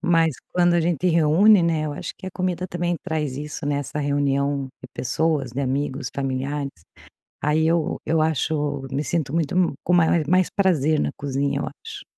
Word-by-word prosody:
Mas 165 -3 +3 0.2
quando 175 -1 +3
a 170 - +3
gente 170 0 -1
reúne, 170 +4 +5
né, 165 -2 +1
eu 150 - -3
acho - - -6
que - - -10
a - - -4
comida 185 -1 -2
também 175 0 -1
traz 150 -4 -2
isso, 150 +2 -6
né, 145 -1 0
essa 145 +1 -5
reunião 140 -1 0 0.2
de - - -8
pessoas, 145 0 0
de 135 - -3
amigos, 135 0 -2
familiares. 140 +1 -2 0.7
Aí 155 +2 +2
eu 165 -1 +1
eu 155 0 +2
acho 150 -3 -1
me 140 +2 0
sinto 150 -3 -2
muito 170 +2 +1
com 180 - 0 0.4
mais 185 +1 +3
prazer 160 -6 +2
na - - 0
cozinha, 140 0 -1
eu - - -2 0.2
acho. - - -8
150 Hz, 175 wpm, -23 LUFS, 140-170 Hz, 0.7 s, reúne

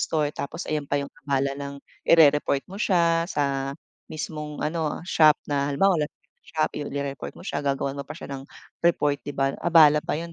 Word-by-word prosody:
store. 150 -2 0
Tapos 140 - -5
ayan 150 -2 -1
pa 145 - +1
yung 140 - -5 0.2
abala 140 0 +1
ng 140 0 -6 0.3
irereport 150 -3 +5
mo 195 - -8
siya 170 -4 +3
sa 140 -3 -1 0.4
mismong 150 -1 -5
ano, 155 -1 -2
shop 155 -4 +6
na 140 0 0
halimbawa, 180 +3 +3
Lazada, - - -10 0.3
Shoppee. 155 -2 -2
O, - - -7
irereport 140 -1 -4
mo - - -12
siya, - - -2
gagawan 140 0 -1
mo 140 - -4
pa 150 - -7
siya - - -9
ng 135 - -6 0.4
report, 145 -4 +2
'di 145 - -5
ba? 135 0 +1
Abala 155 -3 +6
pa - - -1
'yon, 170 0 -7
150 Hz, 190 wpm, -25 LUFS, 140-160 Hz, 0.4 s, shop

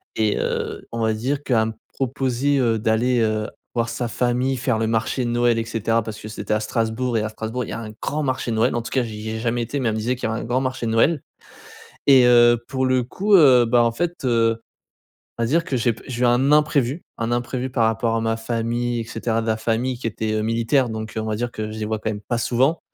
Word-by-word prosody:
et 110 -1 +1
heu, - - -3
on 115 - -4
va 110 0 +2
dire 135 +6 -2
qu'elle 115 -5 +2
me 110 - -4 0.2
proposait, 135 +1 0
heu, 115 -3 +2
d'aller, 115 +3 +2
heu, 110 -1 0 0.3
voir 115 -1 0
sa 120 - -3
famille 125 +3 0
faire 125 -3 0
le 110 - 0
marché 120 +3 0
de - - -1
Noël 120 -1 +2
et - - -1
cetera 115 0 0
parce 110 0 -7
que - - -8
c'était 105 0 -3
à - - +1
Strasbourg 115 +2 -1
et - - +1
à 110 - -2
Strasbourg 110 +3 -4
il - - -10
y - - -4
a 115 -1 -5
grand 150 +1 -2
marché 130 -3 -2
de - - -1
Noël. 115 +3 +2
En 120 - 0
tout 115 - -7
cas 130 - +1
j'y 110 -1 -6
ai 110 0 -3
jamais 120 +1 -1
été 125 +5 -3
mais 125 -4 +1
elle 110 - -1
me - - -2
disait 120 +4 0
qu'il 125 - -3
y - - -2
a - - -2
un - - -4
grand 120 +3 0
marché 130 -2 -2
de - - -1
Noël 135 +7 +3 0.9
et 135 -3 +7
heu, 120 -1 +5
pour 130 -1 -1
le 130 -1 +2
coup, 200 - 0
heu, 135 -9 +7
bah 120 +1 +4
en 115 - +3
fait, 175 +4 -3
heu, 115 -2 +2 0.8
on - - +1
va - - +1
dire 165 +7 +2
que 140 - -3
j'ai 120 -1 +1
pe 110 - -15
j'ai 125 -2 -4
eu - - +4
un 125 +4 +3
imprévu, 150 -1 +2 0.2
un 115 0 -2
imprévu 125 +2 -2
par 120 -3 +2
rapport 115 +1 0
à 115 - 0
ma 115 0 0
famille 120 +1 -2
et - - -2
cetera. 115 0 -2
De 115 - -5
la 110 0 +1
famille 120 +3 -1
qui 120 - -9
était, 110 0 -2
heu, 110 - 0
militaire 115 +4 +1
donc 110 0 -5
on 110 - -1
va 110 -1 -1
dire 120 +2 -3
que 110 -1 -5
je 110 - -7
les 110 - -2
vois 110 +1 -1
quand 110 - -2
même 105 -1 -6
pas 120 - 0
souvent. 130 +7 +1
120 Hz, 270 wpm, -22 LUFS, 110-130 Hz, 0.9 s, et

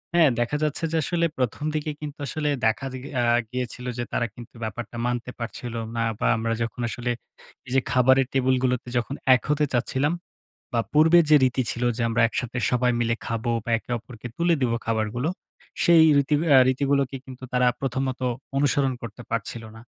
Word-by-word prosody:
হ্যাঁ, 165 -4 +6
দেখা 120 +5 0
যাচ্ছে, 150 +2 -1
যে, - - +2
আসলে 170 +3 +1
১ম 125 +2 -1
দিকে 155 0 -1
কিন্তু 150 -1 -6
আসলে 150 0 -1 0.2
দেখা 110 +5 +1
গ - - -11 0.2
অ্যা 120 - +2 0.3
গিয়েছিল 125 0 -4
যে, 120 - -1
তারা - - 0
কিন্তু 120 -1 -11
ব্যাপারটা 115 +2 -5
মানতে 120 0 -2
পারছিল 115 0 -5 0.2
না। 115 - 0 0.2
বা - - +1
আমরা 115 0 -1
যখন 115 +2 -5
আসলে 120 +1 -2 0.6
এই - - -8
যে, - - +6
খাবারের 130 +1 +4
টেবিলগুলোতে 130 -1 +1
যখন 120 +3 -2 0.2
এক 125 - -2
হতে 150 0 +2
চাচ্ছিলাম, 130 +5 +1 0.6
বা 115 - +2
পূর্বে 160 +3 +6
যে, 150 - +7
রীতি 130 0 +1
ছিল 120 - -4
যে, 115 - -1
আমরা 115 0 0
একসাথে 125 +1 -3
সবাই 125 0 +2
মিলে 115 0 +1
খাবো, 115 +1 -2
বা - - -4
একে 115 - -16
অপরকে 115 0 -11
তুলে 170 0 +3
দিবো 120 -3 +1
খাবারগুলো। 115 +6 -1 0.5
সেই 170 -2 +7 0.2
রীতি 140 +2 +2
অ্যা 140 -3 +7
রীতিগুলোকে 140 0 +1
কিন্তু 130 -1 -11
তারা 125 0 +3
প্রথমত 130 -1 -2 0.4
অনুসরণ 140 -1 +2
করতে 115 +1 -8
পারছিল 115 +1 -3
না। 110 - -11
125 Hz, 180 wpm, -25 LUFS, 120-140 Hz, 0.6 s, যে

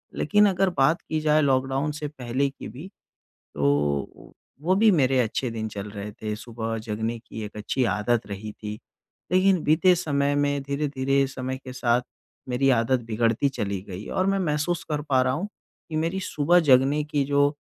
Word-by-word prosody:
लेकिन 210 0 +3
अगर 190 0 +2
बात 135 +6 +3
की 155 - -2
जाए 155 0 +3
लॉकडाउन 135 +1 +1
से 150 0 -4
पहले 135 -1 -2
की 135 - -10
भी, 140 - -9 0.7
तो 70 0 -1 0.3
वो 180 +4 +2
भी 220 +3 +5
मेरे 135 -6 +3
अच्छे 125 +1 0
दिन 110 -1 -3
चल 105 0 -6
रहे 105 0 -6
थे। 105 +1 -5
सुबह 115 0 -5
जगने 110 +2 -2
की 110 -1 -8
एक 105 - -10
अच्छी 115 +5 -1
आदत 115 +3 0
रही 105 +1 -6
थी, 105 0 -7 0.6
लेकिन 185 -1 +4
बीते 175 +4 +4
समय 145 -4 0
में 145 0 +1
धीरे-धीरे 140 -1 0
समय 130 0 -4
के 130 - -7
साथ 120 -1 +1 0.5
मेरी 135 +2 +2
आदत 125 +2 +1
बिगड़ती 115 +4 +1
चली 100 -7 -3
गई 95 +2 -7
और 185 - 0
मैं 195 0 +2
महसूस 165 0 -1
कर 150 -1 -1
पा 130 -2 +4
रहा 130 0 +1
हूँ 175 +9 -2 0.4
कि 160 - -4
मेरी 165 +4 -1
सुबह 175 0 +3
जगने 135 +4 +4
की 150 -1 0
जो 145 +1 +2
135 Hz, 180 wpm, -25 LUFS, 115-150 Hz, 0.7 s, भी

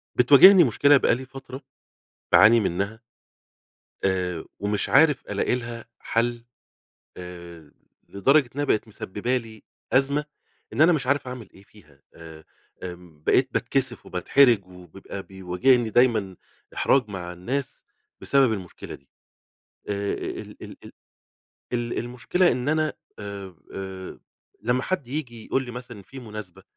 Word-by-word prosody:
بتواجهني 160 +9 +8
مشكلة 140 +3 +4
بقى 120 - +2
لي 130 +2 -7
فترة 135 0 -10 0.7
باعاني 115 +2 +7
منّها 100 +2 -2 1.0
آآ، 90 -3 -1
ومش 105 0 -1
عارف 140 +3 +4
ألاقي - - 0
لها 120 -1 -7
حل 120 +1 -1 0.7
آآ، 85 -3 -11 0.4
لدرجة 135 +6 +3
إنها 145 +1 -1
بقت 110 -5 0
مسببة 110 +4 -3
لي 110 -3 -7 0.3
أزمة 140 +3 +2 0.5
إن 115 - -3
أنا 165 +3 +7
مش 150 -6 -1
عارف 140 0 +1
أعمل 125 -5 -8
إيه 95 - -16
فيها 75 -9 -22
آآ، 80 -1 -12 0.4
آمم، 90 -4 -10
بقيت - - +3
باتكسف - - -1
وباتحرج 120 -8 +3
ويبقى 90 +2 -10
بيواجهني 95 +7 +1
دايمًا 110 -6 +2 0.4
إحراج 130 -5 +2
مع 90 -3 -6
الناس 130 +10 -5 0.4
بسبب 135 -4 +3
المشكلة 95 -5 -7
دي. 70 - -16 0.8
آآ، 100 0 -2
ال - - -7
ال - - -9
ال - - -12 0.8
ال 120 -1 -2
المشكلة 125 +10 +1
إن 125 +2 -3
أنا 155 -1 +1 0.3
آآ، 100 -2 -8 0.2
آآ، 95 -1 -7 0.4
لمّا 125 +3 +1
حد 185 -6 -2
ييجي 125 -5 -5
يقول 135 - 0
لي 125 - -8
مثلًا 120 -3 -9
في 135 +7 -12
مناسبة 110 -6 -9
115 Hz, 130 wpm, -24 LUFS, 95-130 Hz, 1.0 s, بتواجهني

